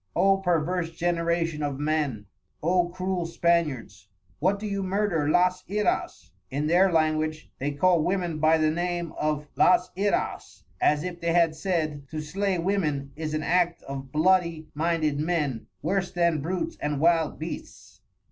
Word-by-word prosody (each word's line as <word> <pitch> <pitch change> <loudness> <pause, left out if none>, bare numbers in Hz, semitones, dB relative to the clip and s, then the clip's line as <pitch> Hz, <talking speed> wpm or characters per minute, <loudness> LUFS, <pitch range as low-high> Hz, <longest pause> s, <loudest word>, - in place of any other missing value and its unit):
O 195 0 +4
perverse 175 -1 0
Generation 170 -2 0
of 145 -2 -2
Men! 145 -8 -1 0.4
O 175 +1 +2
Cruel 185 -1 -2
Spaniards! 145 - -1 0.3
What 190 +6 +2
do 210 - -7
you 200 -1 -2
Murder 190 -6 0
las 180 +2 +2
Iras? 200 - -1 0.2
(In 145 +3 -2
their 180 +4 +4
Language 155 -1 0
they 140 - -1
call 175 +3 +3
Women 175 -4 -1
by 155 +1 +4
the 155 -1 +2
Name 175 0 -2
of 150 -1 -2
las 180 0 +4
Iras 200 +2 -2 0.2
as 150 0 +3
if 180 -1 -6
they 170 0 0
had 170 -2 +3
said: 155 -5 -2
To 155 - -4
slay 185 +5 -1
Women 160 -7 -1
is 155 0 -3
an 155 - -2
Act 175 0 +1
of 135 -1 -7
bloody 165 0 +2
minded 155 -2 0
Men, 150 -7 -1 0.2
worse 195 -2 0
than 170 -4 +1
Brutes 185 - -3
and 150 -1 -1
Wild 165 -1 +2
Beasts. 95 - -8
165 Hz, 155 wpm, -26 LUFS, 150-180 Hz, 0.4 s, O